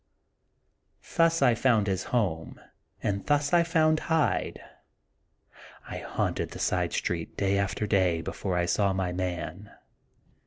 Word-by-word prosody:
Thus 165 -3 +4
I 125 -3 +5
found 115 -3 +2
his 95 -2 -1
home, 95 -10 -1 0.4
and 100 -1 -1
thus 145 +1 +1
I 175 - +6
found 160 -2 +2
Hyde. 160 -2 +1 1.3
I - - -5
haunted - - -2
the - - -9
side - - 0
street 85 -2 -3
day 100 0 +1
after 100 +2 -1
day 95 -5 +2
be - - -4
fore 95 -3 -2
I 85 - +2
saw 100 +2 +1
my 95 -1 -1
man. 90 +2 -4
100 Hz, 140 wpm, -28 LUFS, 90-145 Hz, 1.3 s, I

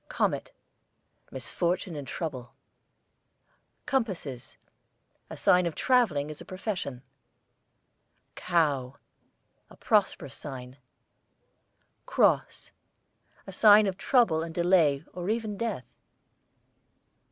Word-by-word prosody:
COMET, - - -1 0.8
misfortune 170 +6 -2
and 145 -2 -7
trouble. 130 -6 -6 1.3
COMPASSES, 185 - -3 0.7
a - - -8
sign 180 -1 +4
of 165 - -4
travelling 185 - +2
as 150 - -10
a - - -7
profession. 185 - -5 1.3
COW, 145 -7 0 0.7
a - - -16
prosperous 190 - +1
sign. 130 -2 -8 1.3
CROSS, - - +1 0.7
a - - -8
sign 210 +2 +6
of 190 -2 -1
trouble 200 -7 +2
and 165 0 -6
delay 170 -5 +3
or 180 +2 -5
even 220 -2 -2
death. 215 - -3
170 Hz, 90 wpm, -28 LUFS, 140-200 Hz, 1.3 s, sign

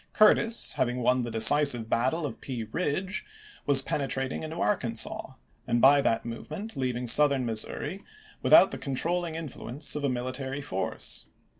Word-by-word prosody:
Curtis, 225 +2 +4
having 125 0 -2
won 125 +1 +2
the 120 - -4
decisive 120 +1 +4
battle 130 +9 -1
of 145 - -7
Pea 125 -4 -5
Ridge, 185 - -2 0.4
was 135 -2 +5
penetrating 135 -2 -3
into 155 +1 -7
Arkansas, 120 - -2 0.3
and 120 - +1
by 140 +3 +6
that 115 -4 -1
move 115 0 -8
ment 205 +8 -6
leaving 125 -2 -3
Southern 140 +1 +5
Missouri 110 -2 -4 0.4
without - - +6
the - - -6
con 135 - -4
trolling 170 +2 -1
influence 150 -3 -5
of 150 - -4
a 140 - +1
military 130 +2 -4
force. 95 -8 -5
135 Hz, 155 wpm, -27 LUFS, 120-155 Hz, 0.4 s, by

